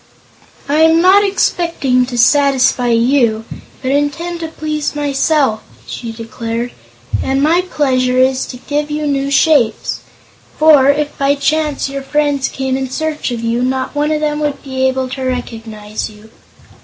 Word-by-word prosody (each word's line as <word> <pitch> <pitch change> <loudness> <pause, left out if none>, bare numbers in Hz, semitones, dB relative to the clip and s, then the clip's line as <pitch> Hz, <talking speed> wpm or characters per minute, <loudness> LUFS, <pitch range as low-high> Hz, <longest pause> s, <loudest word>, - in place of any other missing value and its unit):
"I 290 +2 +1
am 320 +1 +5
not 380 +4 +5
expecting 335 -10 +1
to 250 -1 -5
satisfy 265 -1 +3
you, 230 -1 +2 0.4
but 260 - -1
intend 305 +5 -1
to 325 - -4
please 305 -2 -3
myself," 285 -4 +1 0.2
she 230 -2 -6
declared, 230 +1 -5 0.5
"and 270 0 0
my 320 +5 +3
pleasure 255 -4 +1
is 260 0 +2
to 250 - -8
give 295 +3 -3
you 300 0 -2
new 275 -1 0
shapes. 280 -4 +2 0.6
For, 300 -3 +6
if 290 +1 0
by 280 +1 +2
chance 300 0 0
your 275 0 -5
friends 285 -1 0
came 265 -1 -2
in 265 -1 -3
search 310 +2 -3
of 240 -2 -4
you, 230 +1 -1
not 260 +1 -1
one 295 +1 0
of 305 0 0
them 300 0 -1
would 295 -2 -3
be 265 -1 0
able 260 0 -1
to 265 +1 -6
recognize 225 -5 -5
you." 215 +1 -16
275 Hz, 155 wpm, -15 LUFS, 250-300 Hz, 0.6 s, For